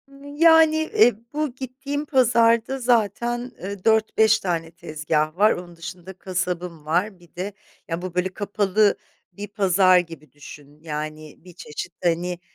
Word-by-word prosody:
Iıı, 275 +1 -15
yani, 320 -1 +6 0.2
e, 245 - +7 0.2
bu 300 -4 -2
gittiğim 270 +3 -5
pazarda 235 -2 +3
zaten, 240 +1 0
ııı, 195 -1 -6
4-5 220 0 +3
tane 165 -4 -3
tezgah 155 -1 -2
var. 210 +3 +5
Onun 175 -1 -6
dışında 175 +2 -9
kasabım 180 -3 -4
var. 180 +5 -1
Bir 175 -2 -22
de 190 +3 -5 0.3
ya, 165 -1 -3
bu 180 -1 -7
böyle 180 +1 0
kapalı 205 0 +1 0.4
bir 205 +3 -7
pazar 190 -2 +4
gibi 165 -4 -8
düşün; 145 0 -14
yani 155 -1 -6
bir 180 +1 -15
çeşit, 165 +2 -8
hani, 175 +1 0
185 Hz, 145 wpm, -23 LUFS, 170-230 Hz, 0.4 s, e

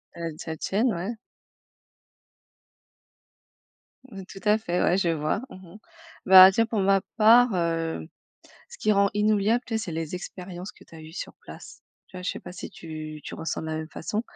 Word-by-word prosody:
Heu, 170 -1 -4
de - - -8
la 160 0 -4
tienne, 220 +9 0
ouais. 190 +7 -4 3.0
Mmh, 195 -3 -9
tout 195 - -11
à 210 +1 +4
fait, 180 -5 -2
ouais, 180 - +3
je 180 -3 +1
vois. 155 +4 -1
Mmh 185 -6 -13
mh, - - -10 0.5
bah, 190 0 +10
tiens, 230 +4 +2
pour 225 -1 -2
ma 195 0 +3 0.2
part, 230 +1 +6
heu, 165 - -2 0.6
ce - - -13
qui 215 - +2
rend 200 -1 +3
inoubliable, 210 +3 +2
tu 230 - -4
sais, - - +1
c'est 170 - -6
les 160 +1 -4
expériences 180 +1 -8
que - - -19
tu - - -18
as 160 - -10
eues 155 0 -12
sur 180 - -7
place. - - -13 0.2
Tu - - -13
vois, 180 - -7
je 180 - -1
sais - - -7
pas - - -10
si 180 - -8
tu 155 -2 -8
tu - - -7
ressens 165 0 -4
de - - -6
la 155 0 -3
même 160 0 -5
façon, 210 +7 -4
185 Hz, 200 wpm, -26 LUFS, 165-210 Hz, 3.0 s, bah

